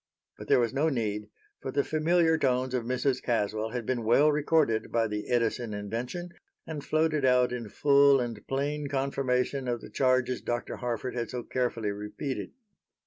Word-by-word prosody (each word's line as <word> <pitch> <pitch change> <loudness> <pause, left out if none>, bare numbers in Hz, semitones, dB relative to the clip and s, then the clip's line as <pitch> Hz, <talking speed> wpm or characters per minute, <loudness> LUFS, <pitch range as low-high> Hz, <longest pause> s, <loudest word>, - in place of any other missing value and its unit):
But - - -8
there - - +5
was 115 -2 0
no 145 +4 +2
need, 105 -6 -2 0.3
for - - -5
the 140 +1 +1
familiar 160 +1 +2
tones 130 -4 0
of 125 -3 -1
Mrs. 130 +1 0
Caswell 110 -2 -1
had 120 -1 -4
been 125 -1 -1
well 140 +7 +5
recorded 150 -6 +1
by 115 -1 +2
the 105 0 -5
Edison 120 -2 0
invention 120 - -4 0.4
and 150 -3 -6
floated 155 -2 +1
out 125 -1 +4
in 120 -3 -5
full 140 +2 +5
and 120 -4 -5
plain 145 +2 -1
confirmation 135 -1 -1
of 120 -1 -1
the - - -12
charges 130 -1 +1
Dr. 120 0 -3
Harford 125 0 -3
had 120 -2 -3
so 125 -1 -4
carefully 115 -5 -1
repeated. 105 +7 -5
125 Hz, 170 wpm, -28 LUFS, 115-140 Hz, 0.4 s, there